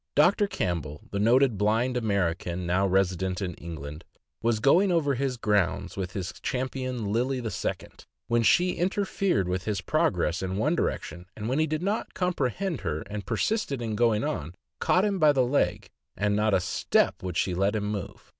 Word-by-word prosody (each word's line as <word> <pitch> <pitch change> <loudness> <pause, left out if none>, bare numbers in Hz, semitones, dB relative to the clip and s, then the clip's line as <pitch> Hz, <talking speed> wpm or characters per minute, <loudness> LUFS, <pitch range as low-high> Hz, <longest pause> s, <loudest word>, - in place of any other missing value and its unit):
Doctor 180 +7 +4
Campbell, 80 - -3
the 100 - -2
noted 120 0 +4
blind 115 +5 +2
American, 90 -5 -1
now 90 +3 +2
resi 95 -1 +2
dent 95 +1 -2
in 95 -3 -3
England, 80 -2 -8 0.4
was 115 -1 +1
going 175 - +4
over 155 -5 +2
his 130 -1 -1
grounds 100 -4 0
with 95 -2 -4
his 95 -3 -4
Champion 130 -4 -2
Lily 130 +4 +1
II., 115 -3 -3 0.7
when 120 0 +2
she 175 - +4
interfered 190 - 0
with 90 0 -2
his 105 -3 -1
progress 95 - +1
in 95 0 -2
one 150 +10 +2
direction, 90 - -3
and 110 0 -4
when 130 +5 0
he 155 - +2
did 155 +2 -2
not 205 +3 -2
comprehend 180 - -1
her, 80 -5 -2
and 105 -2 -5
persisted 140 - 0
in 115 -2 -3
going 115 -1 +2
on, 80 +4 -3 0.2
caught 185 +3 +3
him 200 -2 0
by 155 -2 +6
the 130 -3 +2
leg, 105 -6 0 0.3
and 105 0 +1
not 105 0 +2
a - - +3
step 90 0 +1
would 90 -2 -4
she 90 - +1
let 100 +4 +1
him 105 -1 -1
move. 105 -3 -5
105 Hz, 185 wpm, -27 LUFS, 95-135 Hz, 0.7 s, by